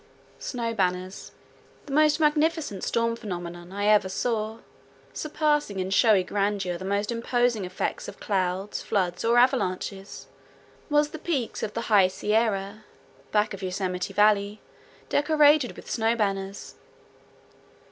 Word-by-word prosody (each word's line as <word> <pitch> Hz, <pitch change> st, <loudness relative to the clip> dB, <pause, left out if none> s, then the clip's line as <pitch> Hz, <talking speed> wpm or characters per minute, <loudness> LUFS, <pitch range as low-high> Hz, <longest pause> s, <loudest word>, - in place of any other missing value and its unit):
SNOW 235 Hz, -3 st, -3 dB
BANNERS 185 Hz, -2 st, -2 dB, 0.5 s
The 280 Hz, -, -7 dB
most 305 Hz, +1 st, +4 dB
magnificent 305 Hz, -, +1 dB
storm 230 Hz, 0 st, 0 dB
phenomenon 175 Hz, -5 st, -7 dB
I 205 Hz, +1 st, -2 dB
ever 210 Hz, -2 st, +4 dB
saw, 220 Hz, +2 st, -2 dB, 0.6 s
surpassing 295 Hz, -8 st, 0 dB
in 185 Hz, 0 st, -2 dB
showy 205 Hz, -2 st, +4 dB
grandeur 195 Hz, -2 st, -1 dB
the -, -, -7 dB
most 200 Hz, +3 st, -1 dB
imposing 235 Hz, -2 st, 0 dB
effects 180 Hz, +1 st, -3 dB
of -, -, -9 dB
clouds, 190 Hz, 0 st, -2 dB
floods, 180 Hz, -3 st, -1 dB
or 235 Hz, +1 st, +3 dB
avalanches, 200 Hz, -6 st, 0 dB, 0.6 s
was 295 Hz, 0 st, +2 dB
the 315 Hz, -, -7 dB
peaks 285 Hz, -9 st, -2 dB
of 210 Hz, -, -4 dB
the 230 Hz, -, -1 dB
High 205 Hz, -5 st, +4 dB
Sierra, 210 Hz, +1 st, -1 dB, 0.5 s
back 210 Hz, 0 st, +1 dB
of 195 Hz, -, -8 dB
Yosemite 185 Hz, -1 st, -3 dB
Valley, 205 Hz, 0 st, +2 dB, 0.5 s
decorated 295 Hz, -2 st, +3 dB
with -, -, -12 dB
snow 225 Hz, 0 st, +1 dB
banners. 195 Hz, -2 st, -3 dB
210 Hz, 125 wpm, -26 LUFS, 195-245 Hz, 0.6 s, most